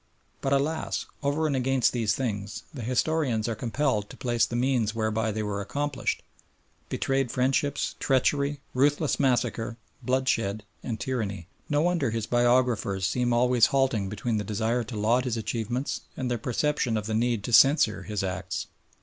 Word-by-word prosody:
But 135 Hz, -, -1 dB
alas! 150 Hz, +4 st, 0 dB, 0.2 s
over 145 Hz, +2 st, 0 dB
and 145 Hz, -3 st, +1 dB
against 130 Hz, -1 st, +2 dB
these 115 Hz, -4 st, +1 dB
things 105 Hz, -6 st, -3 dB
the 135 Hz, -, -6 dB
historians 125 Hz, -1 st, 0 dB
are 115 Hz, -, 0 dB
compelled 115 Hz, -1 st, -1 dB
to -, -, -11 dB
place 120 Hz, -3 st, +1 dB
the 120 Hz, -, -5 dB
means 120 Hz, -3 st, +1 dB
whereby 110 Hz, 0 st, 0 dB
they 110 Hz, +1 st, -2 dB
were 100 Hz, -1 st, -2 dB
accomplished, 145 Hz, +6 st, -2 dB, 0.7 s
betrayed 135 Hz, -2 st, 0 dB
friendships, 135 Hz, +3 st, 0 dB
treachery, 140 Hz, +2 st, +1 dB
ruthless 145 Hz, +3 st, +2 dB
massacre, 120 Hz, -4 st, 0 dB, 0.2 s
bloodshed 115 Hz, -5 st, 0 dB, 0.2 s
and 115 Hz, -3 st, -4 dB
tyranny. 100 Hz, -9 st, -3 dB, 0.2 s
No 145 Hz, +1 st, +2 dB
wonder 170 Hz, -7 st, +1 dB
his 115 Hz, -1 st, -2 dB
biographers 120 Hz, -5 st, +2 dB
seem 125 Hz, +2 st, +1 dB
always 120 Hz, -1 st, +4 dB
halting 130 Hz, -8 st, +1 dB
between 110 Hz, +3 st, -2 dB
the 105 Hz, -, -1 dB
desire 110 Hz, +4 st, 0 dB
to 115 Hz, -1 st, -6 dB
laud 115 Hz, +5 st, +2 dB
his 120 Hz, -2 st, -1 dB
achievements 120 Hz, +4 st, -2 dB, 0.2 s
and 130 Hz, -2 st, -2 dB
their 120 Hz, -, -1 dB
perception 125 Hz, -1 st, 0 dB
of 105 Hz, -, -3 dB
the 110 Hz, -, -2 dB
need 115 Hz, -1 st, +1 dB
to 120 Hz, -, -4 dB
censure 120 Hz, -7 st, +5 dB
his 105 Hz, 0 st, -3 dB
acts. 95 Hz, -2 st, -3 dB
120 Hz, 160 wpm, -27 LUFS, 110-135 Hz, 0.7 s, censure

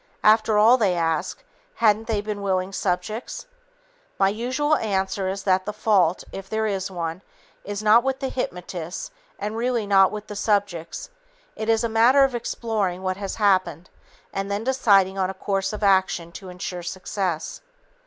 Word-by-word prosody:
After 215 Hz, 0 st, +4 dB
all, 225 Hz, +4 st, +6 dB
they 200 Hz, -7 st, +2 dB
ask, 165 Hz, -, -1 dB, 0.3 s
hadn't 220 Hz, -1 st, +2 dB
they 215 Hz, -3 st, 0 dB
been 210 Hz, -1 st, -5 dB
willing 190 Hz, -1 st, -1 dB
subjects? 195 Hz, +5 st, -3 dB, 0.7 s
My 195 Hz, -, +3 dB
usual 255 Hz, +8 st, 0 dB
answer 195 Hz, -2 st, -1 dB
is 195 Hz, +1 st, -4 dB
that 185 Hz, -1 st, +1 dB
the -, -, -1 dB
fault, 195 Hz, -5 st, +2 dB
if 195 Hz, 0 st, -8 dB
there 220 Hz, 0 st, -1 dB
is 195 Hz, -3 st, -2 dB
one, 170 Hz, -1 st, -4 dB, 0.4 s
is 205 Hz, +1 st, -5 dB
not 220 Hz, +3 st, +6 dB
with 265 Hz, 0 st, -1 dB
the 265 Hz, -, -2 dB
hypnotists 180 Hz, -7 st, -5 dB, 0.3 s
and 210 Hz, +2 st, -4 dB
really 235 Hz, -1 st, 0 dB
not 195 Hz, -2 st, +5 dB
with 210 Hz, 0 st, -6 dB
the 210 Hz, -, -8 dB
subjects. 200 Hz, -, -1 dB, 0.4 s
It 220 Hz, -, -4 dB
is 225 Hz, 0 st, +3 dB
a -, -, +2 dB
matter 235 Hz, +5 st, +5 dB
of 270 Hz, -1 st, +2 dB
exploring 215 Hz, -6 st, -2 dB
what 185 Hz, 0 st, -1 dB
has 195 Hz, -1 st, -4 dB
happened 185 Hz, -5 st, +1 dB, 0.4 s
and 195 Hz, 0 st, -3 dB
then 200 Hz, +2 st, -2 dB
deciding 200 Hz, -7 st, +3 dB
on 185 Hz, -1 st, +1 dB
a 190 Hz, -, -5 dB
course 195 Hz, 0 st, -1 dB
of 210 Hz, 0 st, -6 dB
action 190 Hz, -3 st, +2 dB
to 185 Hz, +2 st, -10 dB
insure 180 Hz, 0 st, -6 dB
success. 185 Hz, -1 st, -4 dB
200 Hz, 170 wpm, -23 LUFS, 185-220 Hz, 0.7 s, all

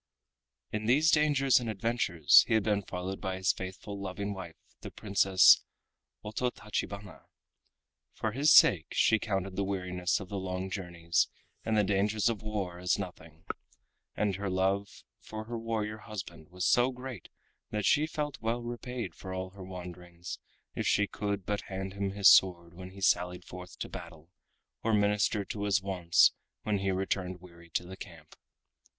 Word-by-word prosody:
In 105 Hz, 0 st, -3 dB
these 150 Hz, +6 st, +5 dB
dangers 140 Hz, -4 st, +4 dB
and 120 Hz, -2 st, -4 dB
adventures 100 Hz, -6 st, +4 dB
he 110 Hz, -, +2 dB
had 110 Hz, -, +3 dB
been 105 Hz, -1 st, +1 dB
followed 95 Hz, 0 st, -5 dB
by 95 Hz, 0 st, -2 dB
his 95 Hz, 0 st, +1 dB
faithful 95 Hz, +2 st, -7 dB
loving 100 Hz, +1 st, -4 dB
wife 90 Hz, -4 st, -8 dB, 0.2 s
the -, -, -8 dB
Princess 95 Hz, -2 st, +5 dB, 0.6 s
Ototachibana. 105 Hz, -4 st, -4 dB, 0.9 s
For 110 Hz, -, -2 dB
his 140 Hz, +6 st, +3 dB
sake 80 Hz, -5 st, +7 dB
she 110 Hz, -, +4 dB
counted 95 Hz, -3 st, -2 dB
the 100 Hz, -, 0 dB
weariness 90 Hz, -2 st, -1 dB
of 95 Hz, -, -8 dB
the 100 Hz, +1 st, -4 dB
long 95 Hz, 0 st, -4 dB
journeys 85 Hz, -3 st, 0 dB, 0.4 s
and 110 Hz, -1 st, 0 dB
the 105 Hz, -, +4 dB
dangers 105 Hz, +3 st, +1 dB
of 115 Hz, -4 st, -3 dB
war 100 Hz, -5 st, -4 dB
as 90 Hz, 0 st, +1 dB
nothing, 85 Hz, -4 st, -9 dB, 0.7 s
and 100 Hz, -3 st, 0 dB
her 100 Hz, 0 st, -3 dB
love 95 Hz, +2 st, -1 dB, 0.2 s
for 110 Hz, 0 st, -7 dB
her 115 Hz, +1 st, -5 dB
warrior 110 Hz, -1 st, -3 dB
husband 100 Hz, -8 st, -8 dB
was 90 Hz, 0 st, -3 dB
so 125 Hz, +2 st, +4 dB
great 125 Hz, -6 st, -8 dB, 0.4 s
that 105 Hz, -1 st, -2 dB
she 150 Hz, +1 st, +4 dB
felt 150 Hz, -2 st, -4 dB
well 115 Hz, +2 st, -1 dB
repaid 120 Hz, -4 st, -5 dB
for 95 Hz, +2 st, -7 dB
all 95 Hz, 0 st, -4 dB
her 95 Hz, 0 st, -11 dB
wanderings 90 Hz, -1 st, -8 dB, 0.3 s
if -, -, -2 dB
she 105 Hz, -, +3 dB
could 100 Hz, -2 st, -3 dB
but 105 Hz, +1 st, -1 dB
hand 95 Hz, 0 st, -4 dB
him 100 Hz, -1 st, -2 dB
his 100 Hz, 0 st, +4 dB
sword 85 Hz, -3 st, +5 dB
when 90 Hz, +1 st, -9 dB
he 100 Hz, +1 st, -12 dB
sallied 90 Hz, -1 st, +1 dB
forth 90 Hz, 0 st, -10 dB
to -, -, -4 dB
battle, 85 Hz, -2 st, -10 dB, 0.5 s
or 115 Hz, -1 st, +2 dB
minister 105 Hz, 0 st, +2 dB
to 100 Hz, +1 st, -4 dB
his 100 Hz, -1 st, +3 dB
wants 90 Hz, -3 st, +4 dB, 0.3 s
when 105 Hz, -2 st, 0 dB
he 95 Hz, 0 st, -1 dB
returned 95 Hz, -1 st, -2 dB
weary 85 Hz, -1 st, -15 dB
to 90 Hz, -, -2 dB
the 95 Hz, +2 st, -8 dB
camp. 80 Hz, -5 st, -12 dB
95 Hz, 165 wpm, -30 LUFS, 90-105 Hz, 0.9 s, sake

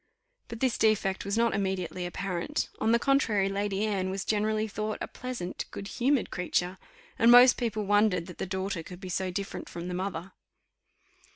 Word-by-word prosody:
But 230 Hz, -, -8 dB
this 260 Hz, -3 st, +1 dB
defect 205 Hz, -3 st, +2 dB
was 200 Hz, +2 st, -1 dB
not 230 Hz, 0 st, +3 dB
immediately 185 Hz, -2 st, -2 dB
apparent: 175 Hz, -1 st, -3 dB
on 220 Hz, -, +2 dB
the 235 Hz, -, +5 dB
contrary, 235 Hz, -7 st, +2 dB
Lady 200 Hz, +1 st, -1 dB
Anne 195 Hz, -3 st, -1 dB
was 190 Hz, +1 st, -3 dB
generally 215 Hz, +1 st, +1 dB
thought 215 Hz, +1 st, -3 dB
a -, -, -4 dB
pleasant, 245 Hz, -8 st, -5 dB
good 200 Hz, -, -7 dB
humoured 260 Hz, +4 st, +1 dB
creature, 180 Hz, +1 st, -1 dB, 0.4 s
and 230 Hz, -, +6 dB
most 245 Hz, +1 st, +9 dB
people 220 Hz, -3 st, -2 dB
wondered 205 Hz, -4 st, +3 dB
that 180 Hz, -1 st, -11 dB
the -, -, -2 dB
daughter 190 Hz, -1 st, -2 dB
could 180 Hz, +2 st, -10 dB
be 190 Hz, -1 st, -7 dB
so 185 Hz, +1 st, -1 dB
different 195 Hz, +2 st, -5 dB
from 170 Hz, +1 st, -6 dB
the -, -, -3 dB
mother. 185 Hz, 0 st, -4 dB
200 Hz, 180 wpm, -29 LUFS, 185-220 Hz, 0.4 s, most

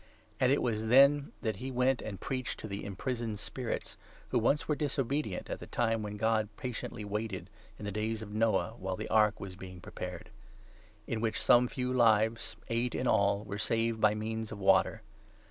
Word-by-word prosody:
And 130 Hz, 0 st, +4 dB
it 140 Hz, -, +2 dB
was 110 Hz, -2 st, -1 dB
then 140 Hz, +4 st, +6 dB
that 110 Hz, -2 st, -1 dB
19 -, -, -9 dB
he 130 Hz, -, -3 dB
went 125 Hz, +1 st, +2 dB
and 100 Hz, -3 st, -6 dB
preached 130 Hz, -3 st, -3 dB
to -, -, -6 dB
the 100 Hz, -1 st, -5 dB
imprisoned 110 Hz, +2 st, -3 dB
spirits, 125 Hz, +3 st, -4 dB, 0.3 s
who 125 Hz, -, +2 dB
once 140 Hz, +6 st, +2 dB
were 150 Hz, -, +2 dB
20 150 Hz, -, -1 dB
disobedient, 135 Hz, -6 st, -1 dB
at -, -, -4 dB
the -, -, -9 dB
time 115 Hz, -2 st, 0 dB
when 105 Hz, 0 st, -5 dB
God 110 Hz, -1 st, +1 dB
patiently 120 Hz, -3 st, -5 dB
waited, 105 Hz, -1 st, -4 dB, 0.3 s
in 105 Hz, -, -8 dB
the 100 Hz, -, -2 dB
days 110 Hz, +2 st, -2 dB
of 105 Hz, -1 st, -9 dB
Noah, 110 Hz, -5 st, +2 dB
while 95 Hz, 0 st, -2 dB
the -, -, -5 dB
ark 105 Hz, -1 st, +4 dB
was 95 Hz, -2 st, -7 dB
being 90 Hz, -1 st, -9 dB
prepared; -, -, -7 dB, 0.7 s
in 110 Hz, -, -2 dB
which 115 Hz, -1 st, 0 dB
some 125 Hz, 0 st, +5 dB
few 125 Hz, 0 st, -2 dB
lives, 110 Hz, -1 st, +3 dB
eight 115 Hz, +1 st, 0 dB
in 130 Hz, -, -1 dB
all, 100 Hz, -3 st, +3 dB
were 100 Hz, 0 st, -5 dB
saved 115 Hz, 0 st, 0 dB
by 105 Hz, 0 st, +5 dB
means 110 Hz, 0 st, -3 dB
of 110 Hz, -, -5 dB
water. 95 Hz, -1 st, +3 dB
110 Hz, 195 wpm, -32 LUFS, 105-125 Hz, 0.7 s, then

